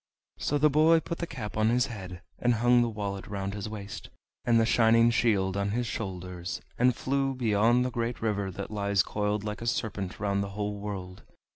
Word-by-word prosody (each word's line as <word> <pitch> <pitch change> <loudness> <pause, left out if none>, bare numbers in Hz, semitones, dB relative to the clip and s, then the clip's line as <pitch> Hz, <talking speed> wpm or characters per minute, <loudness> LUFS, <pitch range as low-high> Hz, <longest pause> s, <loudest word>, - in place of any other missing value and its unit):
So 145 - 0
the 150 +1 +5
boy 160 +3 +5
put 170 +1 -5
the 170 - -2
cap 115 -9 -6
on 110 +1 +3
his 125 +1 +3
head, 95 -5 -8 0.2
and 120 -1 +2
hung 120 +2 +4
the 120 - +1
wallet 100 -3 -4
round 100 -1 -3
his 105 0 -5
waist, 100 -2 -7 0.4
and 120 -2 +4
the 115 - +4
shining 115 0 +5
shield 100 -5 +2
on 100 0 0
his 120 +4 -1
shoulders, 90 -5 -5 0.2
and 125 0 +4
flew 135 +1 0
beyond 120 +1 +3
the 125 - -2
great 120 0 -2
river 100 -3 -1
that 100 +2 -6
lies 100 -2 +1
coiled 105 0 -1
like 105 +1 -4
a 115 - -4
serpent 100 -5 -2
round 100 -1 0
the 100 - -5
whole 105 -1 -2
world. 95 -3 -6
105 Hz, 205 wpm, -28 LUFS, 100-120 Hz, 0.4 s, the